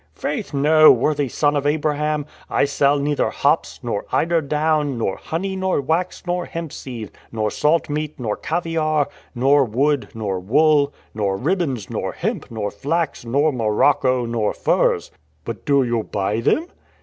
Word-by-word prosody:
"Faith, 225 Hz, -7 st, -3 dB
no, 155 Hz, +2 st, +6 dB
worthy 145 Hz, -2 st, +1 dB
son 145 Hz, +4 st, +1 dB
of 145 Hz, 0 st, 0 dB
Abraham! 150 Hz, 0 st, 0 dB, 0.2 s
I -, -, +2 dB
sell 140 Hz, 0 st, +2 dB
neither 145 Hz, +1 st, 0 dB
hops, -, -, 0 dB
nor 100 Hz, -, -2 dB
eider 165 Hz, 0 st, +2 dB
down, 150 Hz, -2 st, 0 dB
nor 100 Hz, -4 st, -1 dB
honey, 190 Hz, +4 st, -3 dB
nor 190 Hz, -3 st, 0 dB
wax, 160 Hz, +6 st, -1 dB
nor 175 Hz, 0 st, -1 dB
hemp 165 Hz, -3 st, -6 dB
seed, 115 Hz, -6 st, -7 dB, 0.2 s
nor 110 Hz, -2 st, -1 dB
salt 155 Hz, +3 st, +1 dB
meat, 150 Hz, 0 st, -4 dB
nor 110 Hz, -4 st, -2 dB
caviare, 155 Hz, -3 st, 0 dB, 0.3 s
nor 135 Hz, +3 st, +4 dB
wood, 135 Hz, +4 st, +1 dB
nor 100 Hz, -4 st, -2 dB
wool, 145 Hz, +8 st, +3 dB, 0.2 s
nor 100 Hz, -3 st, -1 dB
ribbons, 140 Hz, -, -1 dB
nor, -, -, -3 dB
hemp, -, -, -3 dB
nor 105 Hz, -3 st, -3 dB
flax, 145 Hz, +5 st, -2 dB
nor 140 Hz, +6 st, +2 dB
morocco, 125 Hz, +2 st, +2 dB
nor 115 Hz, -2 st, -1 dB
furs." -, -, +1 dB, 0.3 s
"But 115 Hz, -2 st, -6 dB
do 140 Hz, -2 st, +4 dB
you 120 Hz, -2 st, 0 dB
buy 105 Hz, +1 st, -2 dB
them?" 305 Hz, -, +1 dB
145 Hz, 155 wpm, -21 LUFS, 115-155 Hz, 0.3 s, no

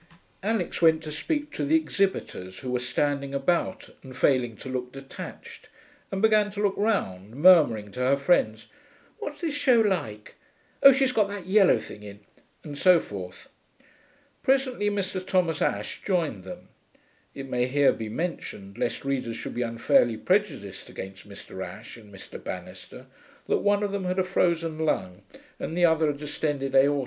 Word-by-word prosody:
Alix 205 Hz, -4 st, -1 dB
went 160 Hz, -1 st, +4 dB
to 155 Hz, -, -6 dB
speak 295 Hz, -, -2 dB
to -, -, -3 dB
the 300 Hz, +3 st, +2 dB
exhibitors, 195 Hz, -, -1 dB
who 130 Hz, -, -4 dB
were 125 Hz, -, 0 dB
standing 140 Hz, +2 st, -1 dB
about 175 Hz, +6 st, -1 dB
and 130 Hz, -1 st, -11 dB
failing 125 Hz, -4 st, +2 dB
to -, -, -10 dB
look 125 Hz, -1 st, -4 dB
detached, 135 Hz, 0 st, -10 dB, 0.4 s
and 195 Hz, +2 st, -3 dB
began 215 Hz, -1 st, +4 dB
to 205 Hz, 0 st, -8 dB
look 205 Hz, -2 st, +2 dB
round, 110 Hz, -, -1 dB
murmuring 145 Hz, -, +5 dB
to 125 Hz, -, -8 dB
her 130 Hz, +2 st, +3 dB
friends, 125 Hz, -7 st, +1 dB, 0.5 s
'What's -, -, -6 dB
the 330 Hz, -3 st, -1 dB
show 275 Hz, -5 st, +3 dB
like?... 165 Hz, -, -1 dB, 0.5 s
Oh, 275 Hz, -, +10 dB
she's 265 Hz, 0 st, +2 dB
got 215 Hz, -5 st, +2 dB
that 200 Hz, -3 st, -7 dB
yellow 195 Hz, 0 st, +5 dB
thing 105 Hz, -, -9 dB
in...' 100 Hz, 0 st, -11 dB, 0.4 s
and 150 Hz, -3 st, -7 dB
so 180 Hz, -2 st, +6 dB
forth. 90 Hz, -, -8 dB, 0.9 s
Presently 260 Hz, -5 st, +1 dB
Mr. 195 Hz, -2 st, -2 dB
Thomas 180 Hz, -4 st, 0 dB
Ashe 100 Hz, +1 st, -1 dB
joined 160 Hz, -, -1 dB
them. 95 Hz, -, -10 dB, 0.7 s
(It 135 Hz, -, -6 dB
may 125 Hz, -1 st, 0 dB
here 140 Hz, +2 st, +3 dB
be 110 Hz, -1 st, -6 dB
mentioned, 110 Hz, -, -5 dB
lest 120 Hz, -, -2 dB
readers 130 Hz, -4 st, -2 dB
should -, -, -6 dB
be 120 Hz, -, -3 dB
unfairly 115 Hz, 0 st, +2 dB
prejudiced 155 Hz, -, -1 dB
against 95 Hz, +2 st, -9 dB
Mr. 100 Hz, -1 st, -8 dB
Ashe 105 Hz, +6 st, -9 dB
and 105 Hz, -3 st, -15 dB
Mr. 95 Hz, -, -10 dB
Banister, -, -, -8 dB, 0.4 s
that -, -, +2 dB
one 205 Hz, 0 st, +2 dB
of 205 Hz, -, -1 dB
them 200 Hz, -2 st, -3 dB
had 180 Hz, +1 st, -1 dB
a 185 Hz, -, +3 dB
frozen 170 Hz, -4 st, 0 dB
lung 95 Hz, -, -1 dB, 0.4 s
and 165 Hz, -, -4 dB
the 175 Hz, -, +5 dB
other 160 Hz, -2 st, +3 dB
a 145 Hz, -, -3 dB
distended 145 Hz, -2 st, -3 dB
aorta. 140 Hz, +2 st, +4 dB
150 Hz, 170 wpm, -26 LUFS, 120-195 Hz, 0.9 s, Oh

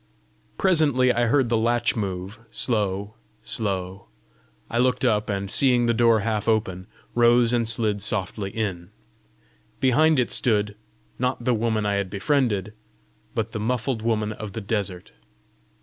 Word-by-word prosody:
Presently 145 Hz, -9 st, +3 dB
I 120 Hz, 0 st, +1 dB
heard 130 Hz, 0 st, +2 dB
the 115 Hz, -, +2 dB
latch 120 Hz, +1 st, +1 dB
move, 95 Hz, -1 st, -4 dB
slow, 100 Hz, -3 st, -1 dB, 0.3 s
slow: 95 Hz, -4 st, -3 dB, 0.6 s
I 120 Hz, -, -2 dB
looked 125 Hz, +1 st, +2 dB
up, 105 Hz, -3 st, +1 dB
and 100 Hz, -1 st, -3 dB
seeing 125 Hz, -3 st, +3 dB
the 115 Hz, -, +2 dB
door 115 Hz, -1 st, +3 dB
half 110 Hz, 0 st, -2 dB
open, 95 Hz, -5 st, 0 dB, 0.3 s
rose 120 Hz, 0 st, +4 dB
and 115 Hz, -2 st, +1 dB
slid 110 Hz, -3 st, 0 dB
softly 100 Hz, 0 st, -2 dB
in. 95 Hz, -5 st, -4 dB, 0.9 s
Behind 150 Hz, +5 st, +3 dB
it 125 Hz, -2 st, +1 dB
stood, 105 Hz, -3 st, +2 dB, 0.4 s
not 125 Hz, -1 st, -1 dB
the 125 Hz, -, +3 dB
woman 110 Hz, -1 st, 0 dB
I 100 Hz, -1 st, +1 dB
had 100 Hz, -2 st, -2 dB
befriended, 105 Hz, -1 st, 0 dB, 0.6 s
but 110 Hz, 0 st, -2 dB
the 110 Hz, -, -4 dB
muffled 120 Hz, +1 st, -1 dB
woman 110 Hz, -2 st, 0 dB
of 110 Hz, -2 st, -7 dB
the 110 Hz, -, -5 dB
desert. 100 Hz, -4 st, -3 dB
110 Hz, 145 wpm, -24 LUFS, 100-120 Hz, 0.9 s, rose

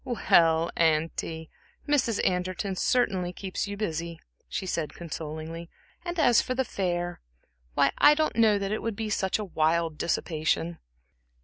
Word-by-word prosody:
"Well, 165 Hz, -9 st, +3 dB
auntie, 160 Hz, 0 st, 0 dB, 0.4 s
Mrs. 260 Hz, -7 st, +2 dB
Anderton 185 Hz, +2 st, -2 dB
certainly 190 Hz, -5 st, +1 dB
keeps 190 Hz, +2 st, -4 dB
you 200 Hz, 0 st, -5 dB
busy," 170 Hz, -4 st, -3 dB, 0.3 s
she 190 Hz, -, -3 dB
said, 165 Hz, -4 st, -3 dB
consolingly 160 Hz, 0 st, -6 dB, 0.3 s
"and 350 Hz, 0 st, -4 dB
as 245 Hz, -6 st, +5 dB
for 255 Hz, -, -3 dB
the 265 Hz, 0 st, 0 dB
fair 175 Hz, -4 st, -2 dB, 0.5 s
why, 140 Hz, -, +4 dB
I 295 Hz, 0 st, +7 dB
don't 310 Hz, 0 st, 0 dB
know 220 Hz, -3 st, +4 dB
that 200 Hz, 0 st, -3 dB
it 215 Hz, -, -1 dB
would 225 Hz, -2 st, -3 dB
be 215 Hz, 0 st, -3 dB
such 190 Hz, -2 st, +1 dB
wild 165 Hz, -5 st, 0 dB
dissipation." 165 Hz, 0 st, -1 dB
180 Hz, 140 wpm, -27 LUFS, 165-215 Hz, 0.5 s, I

